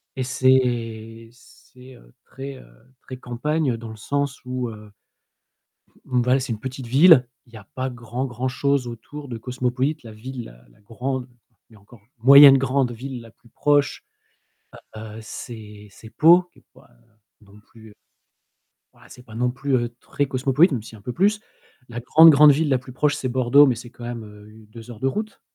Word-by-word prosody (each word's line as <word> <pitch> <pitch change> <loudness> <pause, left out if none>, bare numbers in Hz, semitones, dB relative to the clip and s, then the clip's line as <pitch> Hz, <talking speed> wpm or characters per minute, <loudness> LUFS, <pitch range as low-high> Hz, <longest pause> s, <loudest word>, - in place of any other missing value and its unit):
et 130 - -3
c'est 115 -3 -1
c'est 125 +1 -19
heu, - - -21
très, 135 +1 -9
heu, - - -16 0.3
très 130 - -10
campagne 130 +2 -2
dans 115 -1 -9
le 110 - -10
sens 140 +4 -3
où, 125 -1 -4
heu, 105 -1 -12 1.0
M - - -27
Monval 125 +1 +1
c'est 125 -3 -3
une 105 - -8
petite 130 0 -7
ville, 135 0 +6 0.2
il 120 - -25
y - - -10
a 110 - -15
pas 130 0 -3
grand 125 +1 -5
grand 125 0 -4
chose 140 0 -1
autour 140 +5 -9
de 120 - -6
cosmopolite. 125 +5 -3
La 115 - -11
ville, 120 +3 -8
la - - -16
la - - -26
grande, 125 +4 -5 0.4
mais 110 - -19
encore 105 +2 -19 0.2
moyenne 140 +2 +9
grande 135 -1 0
ville 125 +2 -7
la 115 -1 -15
plus 115 0 -25
proche, 145 +2 0 0.9
heu - - -7
heu, 110 0 -10
c'est 105 -2 -10
c'est 110 +2 -15
Pau, 170 +7 +5
qui - - -26
est - - -23
pas, - - -21
heu, - - -30 0.3
non 100 +1 -18
plus, 110 +1 -18
heu, - - -19 1.0
voilà, - - -21
c'est 125 - -14
pas 110 -3 -14
non 125 +2 0
plus, 135 +2 -3
heu, 120 -1 -1
très 145 0 -3
cosmopolite, 135 +6 +2
même 115 -5 -3
si - - -11
c'est 110 - -13
un 105 - -16
peu 125 - -5
plus. 205 - +1 0.5
La 120 0 -7
grande, 160 +6 +7
grande 150 0 +7
ville 150 +2 0
la 130 - +2
plus 125 +1 -13
proche, 145 +3 0
c'est 130 - -4
Bordeaux 130 +3 +4
mais 130 - +1
c'est 120 +1 -11
quand 120 - -12
même 120 -2 -6
heu, 105 0 -15
u 110 0 -17
2 115 +1 -12
heures 110 -3 -11
de 130 - -1
route. 215 +9 -5
125 Hz, 205 wpm, -22 LUFS, 115-135 Hz, 1.0 s, moyenne